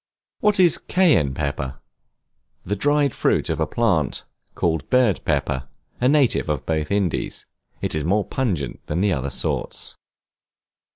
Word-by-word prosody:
What 210 Hz, -1 st, +2 dB
is 175 Hz, -4 st, +6 dB
Cayenne 100 Hz, -, +2 dB
Pepper? 70 Hz, -2 st, -3 dB, 0.9 s
The 105 Hz, -, -1 dB
dried 145 Hz, +4 st, +2 dB
fruit -, -, +1 dB
of -, -, -2 dB
a -, -, +1 dB
plant 90 Hz, -, 0 dB, 0.3 s
called 80 Hz, -3 st, -1 dB
bird 125 Hz, -7 st, +3 dB
pepper, 65 Hz, 0 st, -1 dB, 0.3 s
a 125 Hz, -, +3 dB
native 140 Hz, -, +2 dB
of 75 Hz, -4 st, -2 dB
both 80 Hz, -1 st, -1 dB
Indies. 100 Hz, -4 st, -1 dB, 0.4 s
It -, -, -1 dB
is 75 Hz, -, -1 dB
more 100 Hz, +6 st, +1 dB
pungent 90 Hz, -, -2 dB
than 85 Hz, +4 st, -1 dB
the 100 Hz, -2 st, +2 dB
other 70 Hz, -2 st, -2 dB
sorts. -, -, -2 dB
90 Hz, 140 wpm, -22 LUFS, -, 0.9 s, is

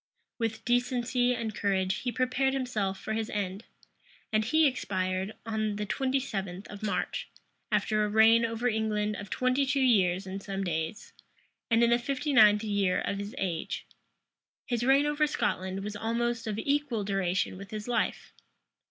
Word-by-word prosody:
[] -, -, -52 dB
With 225 Hz, -1 st, -2 dB
decency 245 Hz, 0 st, +1 dB
and 225 Hz, -2 st, -3 dB
courage, 195 Hz, -1 st, 0 dB
he 245 Hz, -, -2 dB
prepared 255 Hz, +2 st, +1 dB
himself 215 Hz, -7 st, -1 dB
for 220 Hz, -, -4 dB
his 220 Hz, 0 st, -2 dB
end; 200 Hz, 0 st, -3 dB, 0.7 s
and 215 Hz, 0 st, +3 dB
he 315 Hz, +8 st, +3 dB
expired 190 Hz, -6 st, -1 dB
on 215 Hz, -2 st, -1 dB
the 210 Hz, 0 st, -3 dB
twenty 265 Hz, +6 st, 0 dB
seventh 195 Hz, -6 st, -4 dB
of 205 Hz, -, -9 dB
March, 210 Hz, -2 st, -2 dB, 0.4 s
after 215 Hz, -1 st, +2 dB
a 210 Hz, -, 0 dB
reign 220 Hz, +2 st, +6 dB
over 230 Hz, +1 st, -1 dB
England 215 Hz, -2 st, 0 dB
of 200 Hz, -1 st, -8 dB
twenty 255 Hz, +5 st, +1 dB
two 275 Hz, +1 st, +1 dB
years 195 Hz, -7 st, +3 dB
and 195 Hz, +1 st, -5 dB
some 195 Hz, 0 st, -4 dB
days, 160 Hz, +1 st, -3 dB, 0.6 s
and 230 Hz, 0 st, +4 dB
in 235 Hz, -, +4 dB
the 240 Hz, -, +4 dB
fifty 280 Hz, +4 st, -2 dB
ninth 210 Hz, -4 st, +6 dB
year 200 Hz, -4 st, +1 dB
of 200 Hz, -, -2 dB
his 200 Hz, +4 st, -6 dB
age. 175 Hz, -4 st, -3 dB, 0.8 s
His 240 Hz, -2 st, -1 dB
reign 270 Hz, +3 st, +4 dB
over 295 Hz, +1 st, +2 dB
Scotland 190 Hz, -8 st, -2 dB
was 210 Hz, 0 st, -5 dB
almost 230 Hz, +2 st, -1 dB
of 210 Hz, -1 st, -2 dB
equal 280 Hz, -3 st, 0 dB
duration 195 Hz, -2 st, 0 dB
with 195 Hz, +1 st, -9 dB
his 215 Hz, +1 st, -6 dB
life. 240 Hz, -1 st, -1 dB
220 Hz, 170 wpm, -29 LUFS, 195-245 Hz, 0.8 s, reign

